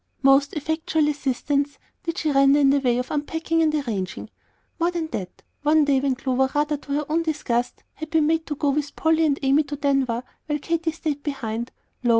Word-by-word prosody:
Most 275 +1 +5
effectual 315 0 0
assistance 285 0 -1 0.2
did 335 -2 -4
she 310 -4 0
render 275 +1 +5
in 275 -1 +5
the 280 - +3
way 245 -3 +1
of 250 +1 -3
unpacking 325 +2 -1
and 315 -1 +3
arranging. 215 -10 -3 0.5
More 340 +1 +2
than 340 -2 -2
that, 185 -9 -6 0.2
one 300 +1 +4
day, 280 -2 +3
when 270 -1 0
Clover, 265 0 0
rather 295 +1 +1
to 285 0 -6
her 295 +1 0
own 320 +2 +1
disgust, 250 -7 -2
had 315 0 -7
been 320 -2 +3
made 320 +1 +1
to 295 - -3
go 285 0 +1
with 290 0 -2
Polly 320 0 +3
and 280 -2 +1
Amy 275 +3 +4
to 290 -1 -5
Denver 275 -4 0 0.2
while 295 -1 0
Katy 330 +2 -1
stayed 305 -2 -3
behind, 235 -5 -4 0.3
lo! 240 - +1
290 Hz, 200 wpm, -24 LUFS, 270-315 Hz, 0.5 s, Most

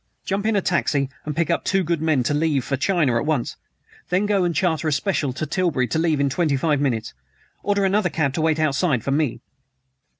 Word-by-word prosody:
"Jump 200 +2 -1
in 220 - +1
a 200 - +2
taxi 140 -6 0
and 150 - -4
pick 165 -1 0
up - - 0
two 195 0 +1
good 170 -2 -1
men 155 -5 +2
to 145 - 0
leave 150 -3 +1
for 140 - -1
China 140 -4 +1
at 115 - -1
once! 145 -7 -1 0.5
Then 185 +3 +1
go 205 -2 +2
and 175 -2 0
charter 160 0 0
a - - +1
special 145 -1 0
to 140 - -3
Tilbury 155 -5 0
to 160 - 0
leave 160 -3 +1
in 140 - +2
twenty 140 0 +1
five 145 0 +1
minutes. 115 -6 -1 0.5
Order 200 -1 +1
another 195 -1 +2
cab 145 -5 -1
to 155 - -2
wait 160 -1 +2
outside 155 - +1
for 135 - -2
me." 145 -3 0
155 Hz, 225 wpm, -22 LUFS, 140-180 Hz, 0.5 s, a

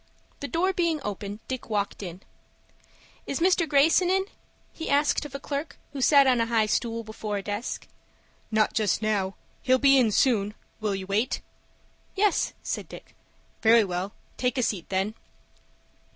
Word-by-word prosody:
The 285 - -4
door 360 +8 +1
being 335 -3 +1
open, 205 +1 -5
Dick 260 -2 -5
walked 205 -2 -1
in. 180 -1 -7 1.1
"Is 275 - -2
Mr. 345 -2 +3
Greyson 315 +5 +4
in?" 380 +1 +2 0.5
he 325 - -6
asked 290 +1 +2
of 280 -2 -8
a - - -4
clerk 285 +2 -4 0.2
who 275 - -4
sat 280 +1 +6
on 250 -3 +3
a 230 - +1
high 225 -2 +2
stool 230 +1 -1
before 215 -1 -4
a 200 - -4
desk. 205 +4 -4 0.6
"Not 215 -1 +2
just 215 -1 +1
now. 195 -3 0 0.3
He'll 260 -1 +4
be 275 0 +5
in 240 -3 +4
soon. 210 -3 +2 0.2
Will 210 -2 -1
you 190 -1 -5
wait?" 205 +5 0 0.7
"Yes," 405 -1 +2
said - - -4
Dick. - - -12 0.5
"Very 225 0 +6
well; 185 +1 -3 0.3
take 250 +1 0
a 250 - +2
seat 195 -7 -2
then." 195 +3 0
230 Hz, 165 wpm, -26 LUFS, 205-280 Hz, 1.1 s, sat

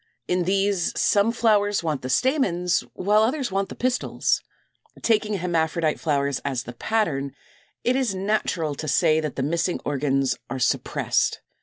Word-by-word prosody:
In 180 -1 0
these 195 -1 +1
some 205 +2 +3
flowers 205 -4 +2
want 155 -5 -1
the 130 - -5
stamens, 180 - +2 0.2
while 210 +3 +3
others 255 +1 0
want 195 0 -1
the - - -8
pistils. 255 0 0 0.6
Taking 215 -2 +2
hermaphrodite 165 -3 0
flowers 140 -3 0
as 130 -4 -2
the 120 - -8
pattern, 140 - -1 0.5
it 250 - +2
is 255 -7 0
natural 185 -5 -1
to 155 +2 -6
say 155 +1 +3
that 155 -3 -3
the 130 - -2
missing 170 +4 0
organs 135 -2 0
are 130 - -3
suppressed. 125 - 0
180 Hz, 150 wpm, -24 LUFS, 145-210 Hz, 0.6 s, some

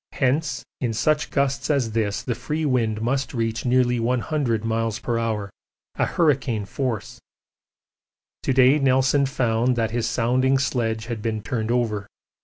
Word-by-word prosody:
Hence 140 +3 0
in 120 -3 -1
such 150 +7 +1
gusts 140 -1 0
as 135 -7 +1
this 110 -2 -1
the 125 - -1
free 155 +6 -3
wind 115 -5 0
must 135 +3 -1
reach 115 0 -2
nearly 125 -1 +2
100 120 -1 0
m.p.h. 115 -1 -1 0.5
a - - +4
hurricane 135 - +1
force. 120 +1 -4 1.2
To - - 0
day 130 +3 +5
Nelson 135 +1 +3
found 125 -1 +1
that 115 -2 0
his 120 0 -1
sounding 130 +3 +2
sledge 115 -4 -1
had 115 -2 -5
been 110 -1 -2
turned 110 -1 -2
over. 110 -4 0
120 Hz, 140 wpm, -23 LUFS, 115-135 Hz, 1.2 s, day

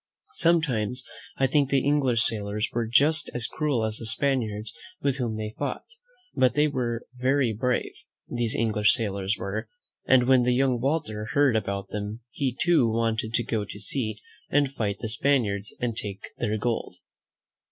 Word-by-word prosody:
Some 170 -1 +3
times 125 -2 -1 0.3
I 135 - +3
think 140 +1 +2
the 140 -1 +1
English 135 -6 +3
sailors 105 0 +1
were 115 -1 -1
just 145 +7 +4
as 120 -2 0
cruel 140 -7 -1
as 110 0 -1
the 115 - -2
Spaniards 110 -5 +2 0.3
with 140 -1 +1
whom 115 -4 -2
they 110 0 -5
fought; 140 -3 -3 0.5
but 125 -2 +2
they 150 +1 +4
were 120 -5 -3
very 130 -1 +1
brave, 125 +4 -1 0.3
these 120 -2 -1
English 110 -2 +3
sailors 100 -3 -1
were, 100 +1 -4 0.4
and 130 -1 +5
when 130 -1 +5
the 125 0 +2
young 130 -2 +2
Walter 125 -7 -1
heard 140 -4 +3
about 100 -2 -2
them, 105 +2 -5
he, 130 -1 -2
too, 160 -9 +3
wanted 115 0 -1
to 120 - +1
go 110 -3 -2
to 105 0 -9
sea 110 0 -2 0.3
and 145 -2 +2
fight 105 -5 -2
the 115 - -3
^ - - 0
Spaniards 115 -6 0
and 120 -2 -2
take 100 -3 -5
their 110 +1 -1
gold. 115 +1 -2
120 Hz, 175 wpm, -26 LUFS, 110-135 Hz, 0.5 s, and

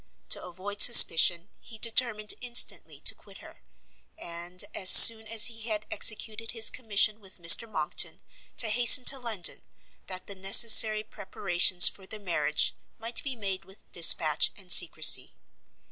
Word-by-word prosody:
To - - -5
avoid 195 +3 -10
suspicion, 175 -5 +4
he 225 - -16
determined 225 -2 -2
instantly 245 -1 -2
to - - 0
quit - - -21
her, - - -20 0.6
and, 175 +1 -10
as 185 - -2
soon 220 -1 +8
as 225 0 +2
he 225 -2 -4
had 215 -1 -7
executed 225 +1 -4
his 225 -2 -1
commission 215 -2 -3
with 195 -3 -14
Mr 175 +6 +1
Monckton, 155 -7 -6 0.4
to 225 - -3
hasten 245 +3 +4
to 270 - -1
London, 220 -8 -5 0.5
that 185 -1 -9
the 200 - -10
necessary 215 +2 +2
preparations 185 -3 0
for 190 -1 -8
their 215 - -13
marriage 155 -6 -5 0.2
might 230 +1 -5
be 275 -2 -9
made 195 -4 -9
with 190 +2 -23
dispatch 160 -3 +2
and 190 -3 -10
secrecy. 160 -3 +3
205 Hz, 145 wpm, -23 LUFS, 180-225 Hz, 0.6 s, soon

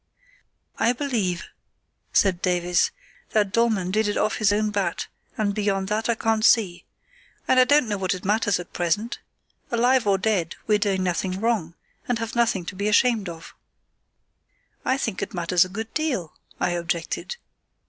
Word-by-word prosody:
"I 235 - +3
believe," 230 -10 -1 0.7
said 190 -3 +3
Davies, 180 -1 +2 0.4
"that 210 -3 +2
Dollmann 215 -5 +1
did 215 +2 +1
it 205 - -1
off 215 - +1
his 210 -2 +3
own 210 +1 +1
bat, 195 -4 -1 0.3
and 205 -2 0
beyond 200 -2 -1
that 220 +2 -1
I 235 - +3
can't 225 -1 0
see. 185 -8 +3 0.6
And 260 - +5
I 255 - +7
don't 285 -1 +4
know 205 -2 -2
that 185 -1 0
it 185 - -9
matters 205 -1 +2
at 175 - -9
present. 180 +7 -1 0.5
Alive 245 0 +2
or 195 -1 +4
dead 190 -4 0
we're 210 -1 +3
doing 195 -2 0
nothing 185 +1 -1
wrong, 205 -7 0 0.3
and 245 - +1
have 230 +1 -5
nothing 230 -7 +1
to 185 - -6
be 200 +2 -2
ashamed 215 -2 +3
of." 165 -1 -10 1.3
"I 260 - +1
think 225 -7 -3
it 225 - -4
matters 175 +1 +3
a - - -9
good 220 +4 -6
deal," 260 - -1 0.3
I - - +1
objected. 170 - -3
205 Hz, 170 wpm, -24 LUFS, 180-225 Hz, 1.3 s, I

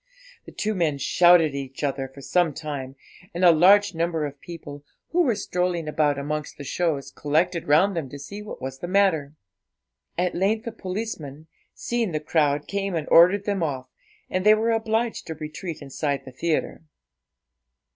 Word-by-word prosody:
The - - -11
two 215 +1 -2
men 165 -7 0
shouted 175 +2 +5
at - - -14
each 135 0 -6
other 135 -1 -1
for 135 +1 -14
some 155 +3 +1
time, 145 -4 -6 0.4
and 180 +1 +2
a 175 - +9
large 195 +5 +5
number 165 -1 -1
of 145 -1 -8
people, 145 -4 -9 0.3
who 355 - +2
were 250 -10 +2
strolling 180 -4 -2
about 150 -2 +1
amongst 150 +2 -4
the 145 - -7
shows, 140 -3 -2
collected 160 +4 0
round 175 +7 +4
them 155 -6 -3
to 145 - -8
see 200 +9 -8
what 210 - -8
was 130 0 -6
the 175 - -5
matter. 175 -7 +2 0.8
At 180 0 0
length 210 +4 0
a 230 - -3
policeman, 180 -8 -6 0.3
seeing 235 -7 -2
the 155 - 0
crowd, 150 -2 +1
came 200 -2 -2
and 155 -3 -2
ordered 185 +4 +6
them 200 -3 -1
off, 130 -5 -3 0.4
and 185 0 -2
they 210 +1 +7
were 225 +2 +1
obliged 225 +1 -1
to 160 - -5
retreat 155 +1 -7
inside 140 +1 -3
the 130 - -9
theatre. 155 +5 -2
165 Hz, 175 wpm, -24 LUFS, 145-195 Hz, 0.8 s, a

